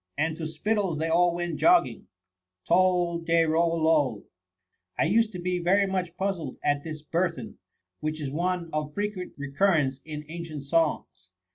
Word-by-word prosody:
And 160 +2 0
to 160 - -4
Spittle's 190 +2 -1
they 160 +2 -1
all 175 +1 +3
went 175 -2 -3
jogging. 350 0 +3 0.6
Tol 180 -2 +3
de 165 0 +2
rol 165 +1 +2
loL' 150 -9 +2 0.7
I - - +3
used, 220 +5 +2
to 180 - -5
be 180 0 -1
very 190 +4 +3
much 185 -3 -3
puzzled 185 -8 -3
at 145 0 +1
this 155 -2 -7
bur 170 +4 +1
then, 125 -9 -10 0.4
which 155 +1 -3
is 140 -3 -4
one 175 +2 -2
of 150 -1 -3
frequent 205 -3 -3
recurrence 145 -1 +1
in 150 -1 -7
ancient 160 -3 -7
songs. 145 - -1
165 Hz, 160 wpm, -27 LUFS, 155-180 Hz, 0.7 s, all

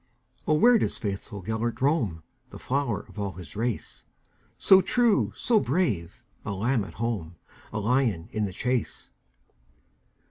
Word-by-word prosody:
"O, 155 - +4
where 235 +8 +6
doth - - -1
faithful 100 -1 -5
Gêlert 110 +4 -2
roam, 125 - +1 0.3
The - - -10
flower 135 -5 -1
of - - -12
all 100 -2 -2
his 90 +6 -10
race, 115 +1 -3 0.5
So 190 +8 +6
true, 235 +1 +2
so 230 -2 +3
brave,—a 120 - -2
lamb 110 +4 +1
at 100 - -10
home,A 110 -2 -5
lion 110 -6 +1
in 110 -2 -1
the 95 - -4
chase?" 125 +5 -2
115 Hz, 135 wpm, -27 LUFS, 100-140 Hz, 0.5 s, where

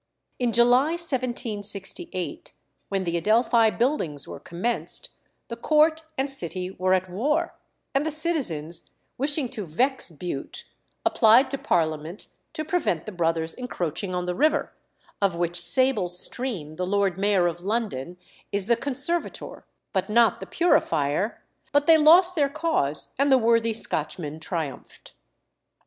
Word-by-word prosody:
In 245 -2 +1
July 245 +6 +4
1768, 240 - 0 0.4
when 195 -1 -1
the 170 -1 -1
Adelphi 225 +4 +3
Buildings 215 - -1
were - - -8
commenced, 190 +8 -2 0.4
the 235 - -6
Court 310 +6 +2 0.2
and 265 - 0
City 185 - 0
were 185 0 +1
at 185 0 -2
war, 300 - -1 0.4
and 275 +1 +1
the 315 - -1
citizens, 270 - +1 0.3
wishing 285 0 0
to 215 -7 -5
vex 255 - 0
Bute, 160 -3 -6 0.4
applied 245 +3 +5
to 275 - -3
Parliament 160 +1 -2 0.2
to 310 - -4
prevent 310 - -1
the 215 - -6
brothers 165 -2 -1
encroaching 185 - -4
on 180 0 -2
the 180 - -2
river, 300 - +1 0.5
of 195 -4 +1
which 175 0 -1
sable 260 -8 +2
stream 180 - -3
the 180 - -2
Lord 200 -2 +1
Mayor 195 -1 +2
of 175 0 -1
London 190 - -3 0.3
is 200 -1 +1
the 235 +2 +3
conservator, 280 +7 -3 0.3
but 190 0 -1
not 230 +1 +3
the - - -8
purifier; 190 - 0 0.3
but 290 0 +2
they 320 0 +6
lost 345 +4 +6
their 285 -4 +2
cause, 305 - -1
and 280 0 +3
the 265 - +7
worthy 230 -1 +2
Scotchmen 155 -7 -3
triumphed. 160 -3 -6
215 Hz, 140 wpm, -25 LUFS, 175-275 Hz, 0.5 s, the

